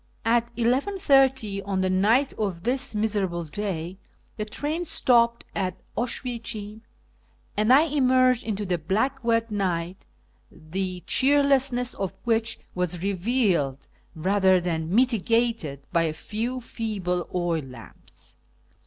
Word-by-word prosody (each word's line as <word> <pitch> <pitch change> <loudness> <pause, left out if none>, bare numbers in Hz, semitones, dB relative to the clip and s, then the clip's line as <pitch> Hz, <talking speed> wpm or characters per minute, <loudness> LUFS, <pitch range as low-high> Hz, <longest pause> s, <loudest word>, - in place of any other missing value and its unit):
At 235 +1 +2
11.30 265 - +2
on 195 -1 -1
the 185 - +1
night 225 +9 +3
of 190 -6 -3
this 255 -1 +1
miserable 205 -5 0
day 180 +1 -4 0.4
the 215 - -3
train 295 +10 -2
stopped 235 -7 +2
at 185 -1 -2 0.2
Oswiecim, 225 -3 -4 0.7
and 215 +3 +2
I 275 +4 +7
emerged 255 -5 +3
into 210 -2 -3
the 180 -2 -1
black 225 - -1
wet 230 -1 +1
night, 185 -3 -2 0.4
the 180 +3 -4
cheerlessness 270 -3 +3
of 195 -2 -4
which 230 -1 0 0.2
was 180 -1 -2
revealed 190 - 0 0.3
rather 190 +2 +3
than 165 -2 -2
mitigated 230 - +1
by 170 -1 +3
a 155 - -1
few 230 +9 -4
feeble 195 -7 -3
oil 175 -2 0
lamps. 125 -4 -10
210 Hz, 120 wpm, -25 LUFS, 180-245 Hz, 0.7 s, I